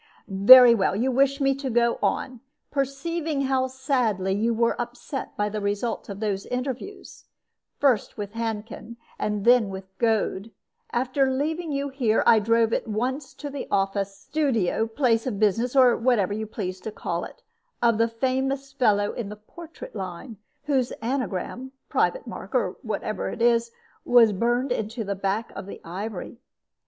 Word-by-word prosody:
"Very 235 Hz, +5 st, +9 dB
well; 195 Hz, -3 st, +1 dB
you 250 Hz, +6 st, +1 dB
wish 275 Hz, +2 st, +2 dB
me 275 Hz, -1 st, +3 dB
to 270 Hz, 0 st, -4 dB
go 235 Hz, 0 st, +2 dB
on. 255 Hz, -2 st, -1 dB, 0.3 s
Perceiving 285 Hz, +2 st, -2 dB
how 265 Hz, -1 st, +1 dB
sadly 250 Hz, -8 st, 0 dB
you 220 Hz, +4 st, +1 dB
were 230 Hz, 0 st, +1 dB
upset 245 Hz, +3 st, -6 dB
by 210 Hz, -, +1 dB
the 210 Hz, 0 st, -4 dB
result 205 Hz, +4 st, -2 dB
of 200 Hz, 0 st, -6 dB
those 200 Hz, -2 st, -2 dB
interviews, 260 Hz, -, -5 dB, 0.5 s
first 260 Hz, -7 st, +1 dB
with 205 Hz, -1 st, -5 dB
Handkin, 225 Hz, 0 st, -5 dB, 0.2 s
and 210 Hz, -1 st, -2 dB
then 240 Hz, -3 st, +5 dB
with 190 Hz, 0 st, -9 dB
Goad, 220 Hz, -2 st, 0 dB, 0.4 s
after 260 Hz, +2 st, +1 dB
leaving 310 Hz, +5 st, -2 dB
you 280 Hz, 0 st, -2 dB
here 245 Hz, -5 st, +1 dB
I 225 Hz, -, +6 dB
drove 230 Hz, +1 st, +2 dB
at -, -, -1 dB
once 255 Hz, +6 st, -2 dB
to 290 Hz, -1 st, -7 dB
the 280 Hz, -1 st, -5 dB
office, 195 Hz, 0 st, -1 dB
studio, 230 Hz, -, 0 dB
place 230 Hz, 0 st, +1 dB
of 225 Hz, -6 st, -2 dB
business, 225 Hz, +5 st, +1 dB
or 255 Hz, -3 st, +6 dB
whatever 230 Hz, -5 st, +1 dB
you 215 Hz, +1 st, -4 dB
please 185 Hz, -3 st, -5 dB
to 220 Hz, -, -5 dB
call -, -, -3 dB
it, -, -, -11 dB, 0.4 s
of 235 Hz, -2 st, +2 dB
the 230 Hz, -, +4 dB
famous 265 Hz, +3 st, -2 dB
fellow 210 Hz, -6 st, +2 dB
in 225 Hz, -4 st, -5 dB
the 210 Hz, -, -7 dB
portrait 315 Hz, +11 st, -12 dB
line, 195 Hz, +4 st, -6 dB, 0.3 s
whose 270 Hz, -4 st, +1 dB
anagram, 250 Hz, +1 st, -4 dB, 0.2 s
private -, -, +1 dB
mark, -, -, -8 dB
or -, -, 0 dB
whatever -, -, -3 dB
it -, -, -7 dB
is, 235 Hz, 0 st, +3 dB, 0.3 s
was 235 Hz, -3 st, +5 dB
burned 240 Hz, +6 st, 0 dB
into 225 Hz, 0 st, -2 dB
the 200 Hz, -1 st, -2 dB
back 200 Hz, +3 st, -2 dB
of -, -, -7 dB
the -, -, -8 dB
ivory. 200 Hz, +6 st, -6 dB
235 Hz, 165 wpm, -25 LUFS, 210-265 Hz, 0.5 s, Very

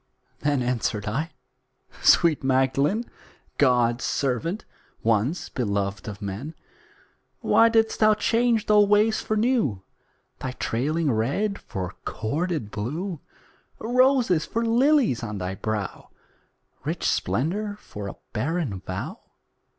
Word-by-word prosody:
Then 145 Hz, -3 st, +1 dB
answered 115 Hz, -4 st, -1 dB
I 135 Hz, +10 st, -2 dB, 0.7 s
"Sweet 165 Hz, -5 st, +5 dB
Magdalen, 135 Hz, -, +2 dB, 0.6 s
God's 125 Hz, -3 st, +3 dB
servant, 155 Hz, -, -1 dB, 0.4 s
once 115 Hz, -, +1 dB
beloved 100 Hz, -5 st, -2 dB
of 105 Hz, 0 st, -7 dB
men, 105 Hz, +11 st, -5 dB, 0.9 s
Why 230 Hz, -, +5 dB
didst 225 Hz, -1 st, +2 dB
thou 215 Hz, -1 st, +5 dB
change 230 Hz, +1 st, +1 dB
old 210 Hz, -1 st, +5 dB
ways 215 Hz, +1 st, +3 dB
for 215 Hz, -, -1 dB
new, 215 Hz, -, +1 dB, 0.6 s
Thy 130 Hz, -, -4 dB
trailing 145 Hz, +7 st, 0 dB
red 145 Hz, -, 0 dB
for 90 Hz, 0 st, -5 dB
corded 145 Hz, -, -2 dB
blue, 155 Hz, -, -4 dB, 0.6 s
Roses 245 Hz, -, +3 dB
for 230 Hz, +1 st, -2 dB
lilies 245 Hz, -, +3 dB
on 105 Hz, -3 st, -4 dB
thy 90 Hz, 0 st, -3 dB
brow, 105 Hz, 0 st, -4 dB, 0.7 s
Rich -, -, -3 dB
splendour 205 Hz, -, 0 dB
for 105 Hz, -1 st, -8 dB
a 100 Hz, -, -6 dB, 0.2 s
barren 135 Hz, -, -1 dB
vow?" -, -, -5 dB
145 Hz, 110 wpm, -25 LUFS, -, 0.9 s, Sweet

